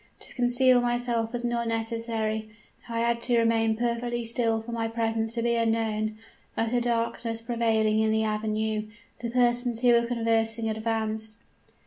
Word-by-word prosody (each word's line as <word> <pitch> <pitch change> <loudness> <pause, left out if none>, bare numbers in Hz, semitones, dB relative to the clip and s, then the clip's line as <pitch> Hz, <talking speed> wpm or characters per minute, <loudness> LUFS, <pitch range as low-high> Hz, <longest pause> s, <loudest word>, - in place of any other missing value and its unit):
To - - -7
conceal 245 0 +4
myself 240 -2 0
was 245 -1 -3
not 235 -1 -1
necessary; 225 -1 -2 0.4
I 230 0 -1
had 235 0 +1
to 240 0 +2
remain 225 -1 +2
perfectly 240 0 -1
still 230 -1 +1
for 225 +2 -8
my 230 -1 -1
presence 225 0 -1
to 230 - -1
be 235 0 +2
unknown, 225 -2 0 0.4
utter 230 +2 +1
darkness 230 -1 -1
prevailing 225 -2 +1
in 220 0 +2
the 220 0 +2
avenue. 215 0 -1 0.3
The 235 0 -3
persons 240 -1 +1
who 250 - +4
were 235 0 +4
conversing 225 -1 +1
advanced. 220 0 -2
230 Hz, 150 wpm, -27 LUFS, 220-235 Hz, 0.4 s, conceal